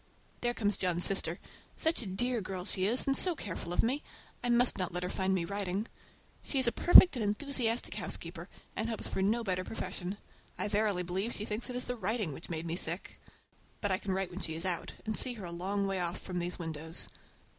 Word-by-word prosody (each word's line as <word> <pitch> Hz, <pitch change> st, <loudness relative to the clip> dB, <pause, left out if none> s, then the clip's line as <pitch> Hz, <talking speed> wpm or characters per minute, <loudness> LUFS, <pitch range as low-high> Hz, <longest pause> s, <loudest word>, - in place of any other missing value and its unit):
There 240 Hz, 0 st, 0 dB
comes 205 Hz, -2 st, +1 dB
John's 180 Hz, -2 st, +5 dB
sister. 185 Hz, -3 st, +2 dB, 0.4 s
Such 320 Hz, -3 st, 0 dB
a 220 Hz, -, -6 dB
dear 240 Hz, +5 st, -1 dB
girl 185 Hz, -1 st, -5 dB
as 195 Hz, -, -2 dB
she 190 Hz, 0 st, +1 dB
is, 240 Hz, +4 st, +3 dB
and 275 Hz, -, +2 dB
so 360 Hz, +2 st, +6 dB
careful 175 Hz, -, -6 dB
of 175 Hz, -, +2 dB
me! 260 Hz, +6 st, 0 dB, 0.4 s
I 245 Hz, -, -1 dB
must 240 Hz, -2 st, +4 dB
not 185 Hz, -, -1 dB
let 180 Hz, +1 st, -1 dB
her 180 Hz, -, -3 dB
find 190 Hz, 0 st, 0 dB
me 175 Hz, -3 st, -1 dB
writing. 200 Hz, +2 st, -2 dB, 0.5 s
She 280 Hz, -, -3 dB
is 260 Hz, -, +6 dB
a 235 Hz, -, +4 dB
perfect, 350 Hz, +2 st, +8 dB
and 245 Hz, -, -2 dB
enthusiastic 235 Hz, +2 st, 0 dB
housekeeper, -, -, -5 dB, 0.3 s
and 225 Hz, -, -2 dB
hopes 225 Hz, -, -2 dB
for -, -, -2 dB
no 220 Hz, +5 st, +2 dB
better 185 Hz, -3 st, -1 dB
profession. 185 Hz, -1 st, -5 dB, 0.4 s
I -, -, -2 dB
verily 205 Hz, -3 st, +1 dB
believe 190 Hz, +6 st, -2 dB
she 210 Hz, -, -4 dB
thinks 215 Hz, +4 st, -2 dB
it 250 Hz, -, -5 dB
is 250 Hz, -, 0 dB
the 245 Hz, -, -3 dB
writing 210 Hz, -, -2 dB
which 160 Hz, -, -8 dB
made 165 Hz, -1 st, -4 dB
me 170 Hz, +1 st, -2 dB
sick! 170 Hz, +1 st, -2 dB, 0.6 s
But 205 Hz, -, -1 dB
I 185 Hz, -, +1 dB
can 200 Hz, -, -4 dB
write 190 Hz, -1 st, -2 dB
when 180 Hz, -, -6 dB
she 160 Hz, -4 st, 0 dB
is 165 Hz, +3 st, -4 dB
out, 180 Hz, -2 st, -1 dB
and 220 Hz, 0 st, -1 dB
see 255 Hz, -, +4 dB
her 205 Hz, -5 st, -8 dB
a 170 Hz, -, -6 dB
long 195 Hz, +4 st, -2 dB
way 195 Hz, -1 st, -1 dB
off 175 Hz, 0 st, -1 dB
from 180 Hz, -1 st, -4 dB
these 175 Hz, +1 st, -2 dB
windows. 160 Hz, -1 st, -4 dB
195 Hz, 230 wpm, -32 LUFS, 180-230 Hz, 0.6 s, perfect